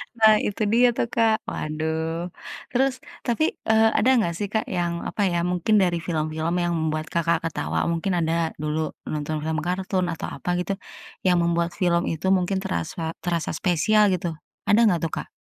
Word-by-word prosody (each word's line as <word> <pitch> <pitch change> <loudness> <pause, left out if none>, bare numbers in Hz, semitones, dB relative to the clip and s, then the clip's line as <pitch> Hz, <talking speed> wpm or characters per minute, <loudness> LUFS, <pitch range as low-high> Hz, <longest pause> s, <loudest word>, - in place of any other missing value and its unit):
Nah, 220 -2 +6
itu 210 +1 -2
dia 245 +2 +5
tuh, 235 - 0
Kak. 225 -1 +2
Waduh. 160 +2 -3 0.4
Terus 265 +1 +2 0.3
tapi, 310 +7 +2 0.2
eee, 220 0 +5
ada 255 - +4
nggak 170 -7 +1
sih, 205 - -2
Kak, 220 - +1
yang, 170 -1 -1
apa 210 - -3
ya, 170 -1 0
mungkin 180 +4 +1
dari 175 -2 +2
film-film 160 0 -2
yang 175 - 0
membuat 155 -1 -1
Kakak 170 0 +1
ketawa, 165 - -1
mungkin 175 +3 -1
ada 165 0 0
dulu 155 +1 -2
nonton 155 +1 -2
film 160 0 -1
kartun 185 +2 -1
atau - - -5
apa - - -6
gitu, 195 +2 -1 0.5
yang 180 -1 +4
membuat 170 0 +1
film 175 -2 +1
itu 165 +3 -2
mungkin 190 +1 +2
terasa 160 - -3
terasa 170 -2 -1
spesial, 205 +6 +3
gitu, 175 -1 -2 0.4
ada 210 - +5
nggak 175 -4 +2
tuh, 165 - -1
Kak? - - -4
175 Hz, 175 wpm, -24 LUFS, 160-200 Hz, 0.5 s, Nah